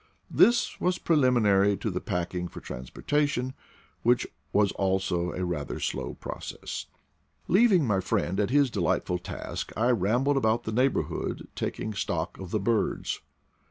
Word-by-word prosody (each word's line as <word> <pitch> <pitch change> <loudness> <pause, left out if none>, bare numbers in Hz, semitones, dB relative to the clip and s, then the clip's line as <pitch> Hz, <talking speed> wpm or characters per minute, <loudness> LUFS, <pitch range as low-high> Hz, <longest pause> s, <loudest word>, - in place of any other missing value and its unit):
This 240 +1 +4
was 180 0 +2
preliminary 110 - +3
to 110 - -2
the 90 - -3
packing 90 -2 -2
for - - -9
transportation, 130 - -2 0.5
which 120 +1 +3 0.3
was 100 -1 +3
also 95 -2 0
a 90 +1 -3
rather 80 -6 -3
slow - - -3
process. - - -6 0.6
Leaving 190 -5 +5
my 105 -5 +2
friend 95 -1 0
at 105 - +1
his 140 -1 +3
delightful 90 -2 0
task - - -5
I 120 +4 +3
ram 115 +3 +2
bled 140 0 +2
about 115 -2 +2
the 110 - -3
neighborhood 125 +4 0
taking 110 - -3
stock 85 -5 -2
of 95 -2 -7
the 110 - 0
birds. 110 +2 0
105 Hz, 145 wpm, -28 LUFS, 90-130 Hz, 0.6 s, Leaving